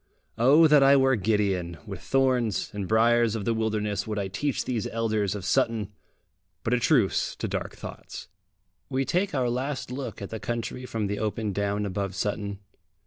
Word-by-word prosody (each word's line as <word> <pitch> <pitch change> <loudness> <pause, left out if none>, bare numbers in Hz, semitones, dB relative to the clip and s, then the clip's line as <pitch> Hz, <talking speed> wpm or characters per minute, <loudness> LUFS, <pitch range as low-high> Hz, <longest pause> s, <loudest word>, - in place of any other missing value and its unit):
Oh 140 +7 +6
that 150 -2 +6
I 135 +1 +7
were 135 -1 +4
Gideon! 95 -5 0
with - - -7
thorns 130 -6 +1
and 100 -2 -4
briers 115 +1 +3
of 105 -3 -3
the 115 - +2
wilderness 110 -2 -1
would 105 -1 -3
I 100 -2 -2
teach 140 +8 -2
these 120 -5 -2
elders 110 -3 -1
of 100 -3 -6
Sutton! 105 +2 +1 0.7
But 115 - 0
a 125 - +3
truce 120 -5 +2
to - - -3
dark - - -4
thoughts! - - -9 0.6
We 135 0 0
take 180 +6 0
our 130 -2 +1
last 130 +2 -3
look 130 +1 -5
at 100 - -7
the 110 - -4
country 120 +3 -4
from 110 -3 -2
the 105 +1 -2
open 110 -1 -2
down 100 +1 -1
above 100 -1 -3
Sutton. 100 0 -2
110 Hz, 180 wpm, -26 LUFS, 100-125 Hz, 0.7 s, I